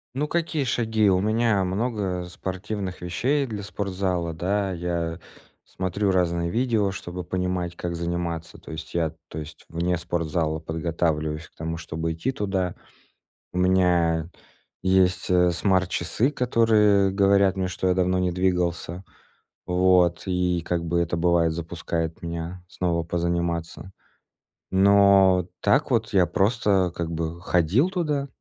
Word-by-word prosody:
Ну, 145 +3 0
какие 160 -2 -1
шаги? 110 -4 +1
У 90 - +3
меня 110 -1 +2
много 95 -2 -2
спортивных 95 +1 -5
вещей 130 +12 0
для 110 -5 -5
спортзала, 95 -4 -2
да, 95 +4 -1
я 85 -2 -3 0.5
смотрю 95 +2 -2
разные 85 -2 +1
видео, 115 -1 +1
чтобы 90 -1 -6
понимать, 90 -1 -2
как 85 0 -4
заниматься, 85 -1 -3
то - - -12
есть 80 +1 -8
я, 80 -2 +1 0.2
то - - -9
есть 75 0 -8
вне 85 +2 0
спортзала 85 -2 -1
подготавливаюсь 80 -1 -2
к - - -34
тому, 80 +1 -4
чтобы 80 0 -3
идти 85 +11 -2
туда. 95 -6 -2 0.8
У - - -6
меня 90 -3 +2 0.5
есть, 95 -1 +2
э, 90 -1 +4
смарт-часы, 95 - +1
которые 110 -6 +3
говорят 100 0 +3
мне, 95 -1 0
что 90 +1 -2
я - - +4
давно 90 0 +1
не 90 -1 +1
двигался. 90 -1 -1 0.6
Вот, 90 -1 +3
и 90 -2 0
как 85 -1 -1
бы 85 +1 0
это, 85 0 0
бывает, 85 -1 +2
запускает 85 0 -4
меня 85 +2 -5
снова 85 -2 -1
позаниматься. 85 +1 -2 0.8
Но 95 -2 +5
так 150 +3 +3
вот 115 -2 +1
я 95 -2 +5
просто 100 -3 +2
как 85 -1 -4
бы 85 +1 -4
ходил 90 - +2
туда, 150 -7 -1
90 Hz, 135 wpm, -25 LUFS, 85-100 Hz, 0.8 s, Но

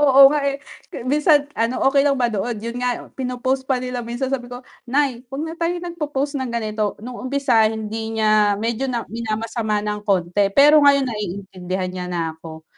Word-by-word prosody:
Oo 275 -1 +7
nga, 295 - +1
eh, 275 - -2 0.3
ke - - -8
minsan, 295 +2 +3
ano, 230 +1 -1
okey 275 +1 +4
lang 280 0 +2
ba 240 -3 0
doon, 220 +3 -2
yun 235 +3 -5
nga 250 -1 -3
pino-post 260 +1 -2
pa 265 - +2
nila 250 0 -4
minsan, 240 +3 -4
sabi 245 -2 -2
ko, 245 0 -9 0.2
"Nay, 265 -2 +1
wag 275 +3 -4
na 320 - -5
tayo 335 +1 -1
nagpo-post 295 -4 -3
ng 260 - -3
ganito." 215 -3 -2
Nung 250 0 -7
umpisa 255 -4 +2
hindi 220 0 -4
niya 215 -2 +3
medyo 235 +5 -2
na 240 -3 -2
minamasama 220 -1 -2
ng 210 0 -2
konti 195 -1 +1
pero 295 +2 +7
ngayon, 280 -1 +5
naiintindihan 190 -4 -4
niya 180 -1 -5
na 175 -1 -2
ako 160 0 -11
240 Hz, 190 wpm, -21 LUFS, 215-270 Hz, 0.3 s, Oo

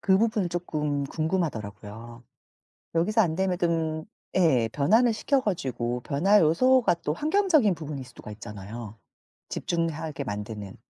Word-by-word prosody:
그 190 -1 +4
부분은 215 -4 +1
쪼끔 150 -5 -2
궁금하더라고요. 120 - -4 0.7
여기서 210 +7 +2
안 165 -6 +2
되면 190 -1 +1
뜸 160 -2 0 0.3
예. 140 -11 +4
변환을 225 - +4
시켜 275 +5 +1
가지고 125 - -2
변화 180 +11 +3
요소가 245 +10 +4
또 150 - +1
환경적인 310 - +3
부분일 150 -4 -6
수가 120 -3 -12
있잖아요. 105 +1 -8 0.5
집중하게 160 -3 -2
만드는. 105 -2 -6
160 Hz, 305 characters per minute, -26 LUFS, 120-190 Hz, 0.7 s, 그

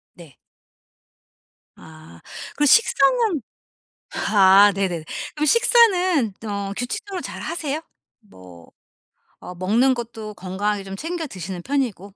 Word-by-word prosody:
네. 165 -7 -15 1.4
아 155 - -15 0.3
그리고 295 - +1
식사는 460 - +3 0.7
아 200 0 +5
네네네. 180 -5 -3 0.3
그럼 300 0 -1
식사는 370 - +3
어 200 -1 -4
규칙적으로 375 - -5
잘 - - -8
하세요? 310 -2 -3 0.4
뭐 90 - -16 0.7
어 180 - -9
먹는 225 +9 +2
것도 225 -3 -7
건강하게 200 +2 -3
좀 195 0 -8
챙겨 330 0 -4
드시는 185 - -7
편이고. 245 -7 -2
210 Hz, 225 characters per minute, -21 LUFS, 190-305 Hz, 1.4 s, 아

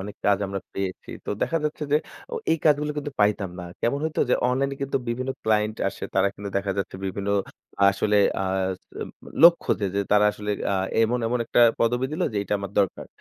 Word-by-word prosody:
অনেক 100 +2 -7
কাজ 100 -1 +4
আমরা 100 0 -4
পেয়েছি। 95 -1 -4
তো - - -4
দেখা 165 - +1
যাচ্ছে 150 0 -2
যে, - - +7 0.4
অ - - -1 0.2
এই 165 - +1
কাজগুলো 150 -1 +3
কিন্তু 145 -1 -4
পাইতাম 105 -2 +2
না। - - -6 0.2
কেমন 130 +5 +1
হইতো? 160 -1 -1
যে, - - +6
অনলাইনে 135 +2 0
কিন্তু 140 - 0
বিভিন্ন 130 +3 -2
ক্লায়েন্ট 110 0 +1
আসে - - -7
তারা 95 +1 +4
কিন্তু 100 0 -6
দেখা 100 0 0
যাচ্ছে 95 -1 -3
বিভিন্ন 100 +1 -4 0.6
আসলে 105 +2 +1 0.2
আ - - 0 0.6
উম - - -7 0.3
লক্ষ্য 170 0 +7
যে, 100 - +1
যে 100 - +2
তারা 105 0 +5
আসলে 105 0 -5 0.2
আ - - +2 0.3
এমন, 120 +2 +2
এমন 125 +2 0
একটা 120 - +2 0.2
পদবী 120 +3 +2
দিলো 175 +4 0
যেইটা 100 0 -2
আমার 100 -1 -5
দরকার। 100 -3 0
105 Hz, 200 wpm, -25 LUFS, 100-140 Hz, 0.6 s, যে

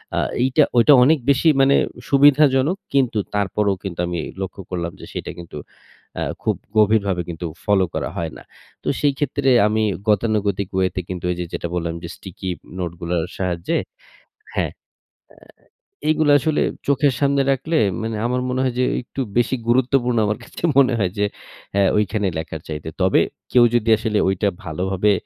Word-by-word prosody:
আ - - +1 0.2
এইটা, 135 +4 +4
ঐটা 120 +5 +7
অনেক 155 +4 +4
বেশি 140 +4 +3
মানে 135 +1 +5 0.3
সুবিধাজনক। 145 +3 +4 0.2
কিন্তু 130 -5 +2 0.2
তারপরেও 100 0 +1
কিন্তু 95 -4 -6
আমি 85 -1 -3 0.2
লক্ষ্য 95 +1 -5
করলাম 85 -2 -3
যে - - -8
সেটা - - -5
কিন্তু 85 -3 -9 0.6
আ - - -3 0.2
খুব - - +1 0.2
গভীরভাবে 100 -4 +3
কিন্তু 85 +1 -5 0.2
ফলো 100 -2 +3
করা - - -2
হয় 80 -2 -3
না। - - -13 0.4
তো - - -8
সেই 145 -1 +3
ক্ষেত্রে 140 -1 0 0.2
আমি 110 +1 0 0.3
গতানুগতিক 105 -2 +1
ওয়ে 95 0 +3
তে 95 - -1
কিন্তু 90 -1 -5
এই 90 - -3
যে 90 - -2
যেটা - - -3
বললাম 85 -1 -2
যে - - -5
স্টিকি 95 0 -9 0.3
নোটগুলোর 85 -1 -2
সাহায্যে 90 - -1 0.8
হ্যাঁ। - - 0
এ্যা - - -52 1.3
এইগুলো 155 -1 +3
আসলে 155 +2 0 0.2
চোখের 140 -1 +2
সামনে 140 -1 +3
রাখলে 145 +5 -1 0.3
মানে 110 0 -3
আমার 125 +1 0
মনে 130 0 -1
হয় 130 -2 -1
যে - - +3 0.2
একটু 125 - -7 0.2
বেশি 120 +2 +2
গুরুত্বপূর্ণ 125 0 +2
আমার 105 +1 -1
কাছে - - -11 0.2
মনে 130 -2 +5
হয় 95 -4 +1
যে 105 - +2 0.5
অ্যা 100 - +3 0.2
ওইখানে 105 0 0
লেখার 80 -1 -6
চাইতে। 75 0 -5
তবে 95 - +4 0.3
কেউ 125 -1 +6
যদি 115 -1 +1
আসলে 110 -1 -1
ওইটা 95 +2 +1 0.2
ভালোভাবে 95 +4 0
105 Hz, 165 wpm, -21 LUFS, 95-130 Hz, 1.3 s, ঐটা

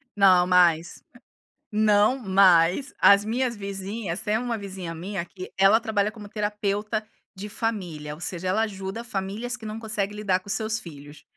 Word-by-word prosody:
Não, 185 -3 +5
mas 175 -2 +3 0.7
não, 210 +3 +3
mas 190 +3 +4
as 200 +1 +6
minhas 240 +2 -1
vizinhas 195 -1 -5
tem 210 +1 +1
uma 240 0 -2
vizinha 190 -4 -6
minha 180 +1 -4
que 185 +1 -10
ela 195 +3 +6
trabalha 215 -2 0
como 210 -2 -11
terapeuta 210 0 -2 0.3
de 205 +2 -7
família, 180 -10 -4
ou - - -16
seja, 180 +1 -4
ela 190 +4 +1
ajuda 195 0 -4
famílias 215 +3 -4
que 220 - -12
não 215 +1 -5
conseguem 210 -2 -3
lidar 200 -3 0
com 185 - -22
os 200 - -1
seus 220 0 -1
filhos. 145 -5 -12
200 Hz, 165 wpm, -25 LUFS, 185-215 Hz, 0.7 s, as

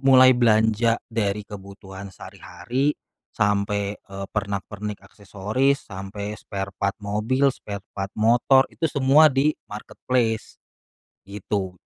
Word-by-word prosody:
mulai 130 -1 +8
belanja 115 -1 +3
dari 105 -2 -2
kebutuhan 100 -1 -10
sehari-hari 120 - -3 0.3
sampai, 100 0 0
eee, 100 0 -8
pernak 100 -1 -2
pernik 105 0 -7
aksesoris, 105 +8 -1
sampai 100 +1 -6
spare 100 -2 -6
part 100 0 0
mobil, 110 +7 +1
spare 100 -4 -8
part 95 0 -4
motor, 120 +4 +4
itu 160 - -1
semua 145 +2 +5
di 140 +2 +2 0.2
marketplace 110 +1 -2 0.7
gitu. 100 -1 -3
105 Hz, 110 wpm, -23 LUFS, 100-125 Hz, 0.7 s, mulai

